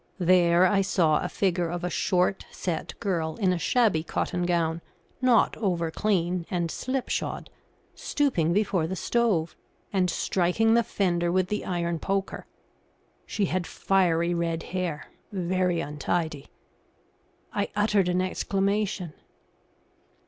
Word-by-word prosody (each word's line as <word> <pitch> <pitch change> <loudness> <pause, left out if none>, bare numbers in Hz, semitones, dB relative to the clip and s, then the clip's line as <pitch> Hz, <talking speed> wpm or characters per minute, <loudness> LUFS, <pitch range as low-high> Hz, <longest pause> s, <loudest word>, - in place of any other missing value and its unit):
There 175 -1 +4
I 195 +1 +3
saw 170 -5 +2
a - - -3
figure 180 -3 0
of 175 +1 -4
a 180 - -1
short, 180 +2 +1
set 175 -3 -4
girl 170 -7 -1
in 190 -4 +1
a 175 - -2
shabby 210 -2 +2
cotton 175 +2 -2
gown, 170 -1 0 0.4
not 250 -3 +4
over 175 -6 -1
clean, 180 -3 0
and 170 -3 -1
slipshod, 260 0 -3 0.4
stooping 225 - 0
before 185 -4 +1
the 190 - -3
stove, 195 -7 0 0.4
and 185 -2 +2
striking 190 +6 +1
the 235 - +5
fender 175 -6 0
with 185 0 +1
the 210 - -2
iron 170 -2 -1
poker. 195 +2 -2 0.8
She 205 - 0
had 185 -1 -2
fiery 175 -3 +1
red 165 -1 -1
hair, 175 -5 -2 0.3
very 180 -2 0
untidy. 150 0 -2 1.1
I 205 0 -1
uttered 205 -3 +2
an 180 +1 +1
exclamation. 195 -2 -1
180 Hz, 125 wpm, -26 LUFS, 170-195 Hz, 1.1 s, the